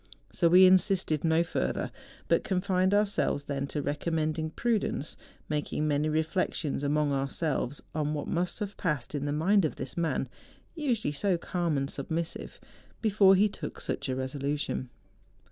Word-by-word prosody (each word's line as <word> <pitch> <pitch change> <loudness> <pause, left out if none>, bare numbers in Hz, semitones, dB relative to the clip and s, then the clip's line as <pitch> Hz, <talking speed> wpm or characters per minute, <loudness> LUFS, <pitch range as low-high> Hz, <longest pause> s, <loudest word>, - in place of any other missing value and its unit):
So 170 - +3
we 185 +2 +8
insisted 185 -4 +3
no 165 0 +3
further, 170 - -2 0.4
but - - +3
confined 185 0 +1
ourselves 205 -8 +1
then 140 -1 -2
to 145 0 -3
recommending 155 +1 -1
prudence, 210 - -1 0.3
making 150 0 -1
many 150 +1 +1
re¬ 155 +1 +1
flections 160 -4 -1
among 145 0 +1
ourselves 140 0 -1
on 150 -1 -1
what 145 - -4
must 175 +1 -1
have 205 -1 -4
passed 150 -8 -2
in 145 -1 -2
the 145 - -1
mind 185 +7 +3
of 155 - -1
this 130 -1 -6
man, 160 -6 0 0.5
usually 245 - -1
so 185 +4 +1
calm 170 -3 -1
and 135 0 0
sub¬ 140 - -5
missive, 165 0 -4 0.4
before 200 -3 +5
he 205 +3 +5
took 165 -7 -7
such - - -3
a 130 - 0
resolution. 135 0 -2
160 Hz, 160 wpm, -29 LUFS, 145-185 Hz, 0.5 s, we